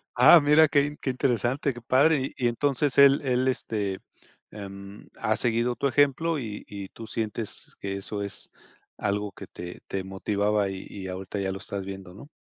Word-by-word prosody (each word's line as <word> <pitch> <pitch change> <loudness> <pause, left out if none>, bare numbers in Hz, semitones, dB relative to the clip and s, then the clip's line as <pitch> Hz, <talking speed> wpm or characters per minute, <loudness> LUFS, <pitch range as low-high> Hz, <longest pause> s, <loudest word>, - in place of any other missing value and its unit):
Ah, 125 +7 +9
mira 150 +2 +6
qué 140 -1 +3
in 145 0 -6
qué - - -3
interesante, 130 +1 0
qué 120 - -10
padre, 135 +3 +3
y 125 - -1
y - - +6
entonces 135 +3 0
él 140 0 +7
él, 130 -1 +1
este, 105 -6 -1 0.5
em, 100 0 -9
ha 110 - +1
seguido 120 +2 +1
tu 140 - 0
ejemplo 145 +4 +2
y 110 -5 -6
y 100 -2 -7
tú 115 - -10
sientes 110 -1 -4
que 100 0 -4
eso 100 +1 -5
es 100 - -6 0.5
algo 105 0 -1
que - - -11
te 90 0 -9
te 95 -1 -3
motivaba 100 +1 0
y 95 -1 -6
y 95 -2 -7
ahorita 95 +2 -5
ya 95 -1 -1
lo 95 - -4
estás 100 -1 -4
viendo, 95 -2 -8
¿no? 110 +9 -12
110 Hz, 190 wpm, -26 LUFS, 100-135 Hz, 0.5 s, Ah